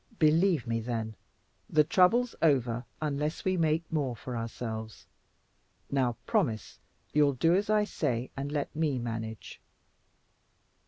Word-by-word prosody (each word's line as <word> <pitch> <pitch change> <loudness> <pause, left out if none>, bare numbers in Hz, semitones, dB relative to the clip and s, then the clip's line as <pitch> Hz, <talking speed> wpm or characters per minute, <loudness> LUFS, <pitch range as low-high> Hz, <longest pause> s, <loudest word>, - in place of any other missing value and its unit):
Believe 160 -1 +3
me, 115 -1 -1
then, 110 -1 -3 0.6
the 155 -1 +5
trouble's 210 +10 +3
over 125 -6 +2 0.2
unless 150 +1 -2
we 190 0 +2
make 160 -1 +2
more 140 -6 0
for 125 +3 -6
ourselves. 110 -1 -5 0.9
Now, 130 -4 +1
promise 110 -3 -1 0.3
you'll 145 -1 +4
do 165 +7 +3
as 200 +3 +1
I 215 -1 +4
say 125 - -2
and 140 +1 -4
let 150 0 -2
me 150 -4 +1
manage." 115 -2 -5
140 Hz, 125 wpm, -30 LUFS, 115-160 Hz, 0.9 s, the